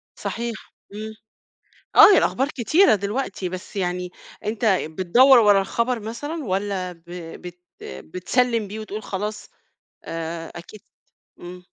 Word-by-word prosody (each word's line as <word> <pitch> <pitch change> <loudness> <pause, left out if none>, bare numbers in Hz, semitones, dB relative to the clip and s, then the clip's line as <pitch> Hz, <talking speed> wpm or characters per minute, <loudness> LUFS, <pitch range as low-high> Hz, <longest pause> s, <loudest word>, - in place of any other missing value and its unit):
صحيح، 235 0 -4 0.4
امم، 215 +1 -6 0.8
آه 410 - +10
هي - - +6
الأخبار 270 +2 +1
كتيرة 305 - +3
دلوقتي، 200 -1 -3
بس 185 +3 -8
يعني 180 -1 -2 0.3
أنت 215 +2 -3 0.2
بتدوّر 190 - +5
ورا 205 -3 +5
الخبر 235 +4 -1
مثلًا 290 +9 -5
والّا 190 -2 -2
ب 170 -1 -20 0.4
بت 180 0 -10 0.2
بتسلّم 230 +5 -1
بيه 210 +3 -7
وتقول 215 0 -6
خلاص 210 +2 -5 0.5
آآ، 165 0 -5
أكيد 175 +4 -11 0.6
امم. 180 +1 -10
205 Hz, 120 wpm, -23 LUFS, 180-235 Hz, 0.8 s, آه